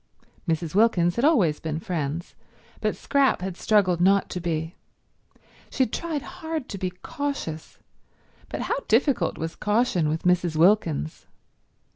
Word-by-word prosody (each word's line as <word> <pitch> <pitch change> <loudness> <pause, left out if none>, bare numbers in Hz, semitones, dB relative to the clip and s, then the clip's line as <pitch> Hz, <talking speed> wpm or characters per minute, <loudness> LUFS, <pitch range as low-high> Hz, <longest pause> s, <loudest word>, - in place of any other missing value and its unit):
Mrs. 160 -1 -1
Wilkins 185 -5 +3
had 235 - -1
always 200 - +3
been 155 -1 -3
friends, 165 -1 -3 0.5
but - - -1
Scrap 275 -8 +2
had 190 -2 -3
struggled 185 -4 +2
not 195 +2 +3
to 180 - -3
be. 165 -1 -2 1.0
She 265 - +1
had 230 - -4
tried 325 -4 -2
hard 325 -5 -5
to 195 - -6
be 185 - -1
cautious, 180 - -5 0.7
but - - -4
how - - -1
difficult 250 +4 +2
was 160 +1 -4
caution 210 -7 +1
with 160 +1 -2
Mrs. 180 -2 +2
Wilkins! 155 - +2
180 Hz, 140 wpm, -25 LUFS, 165-240 Hz, 1.0 s, Wilkins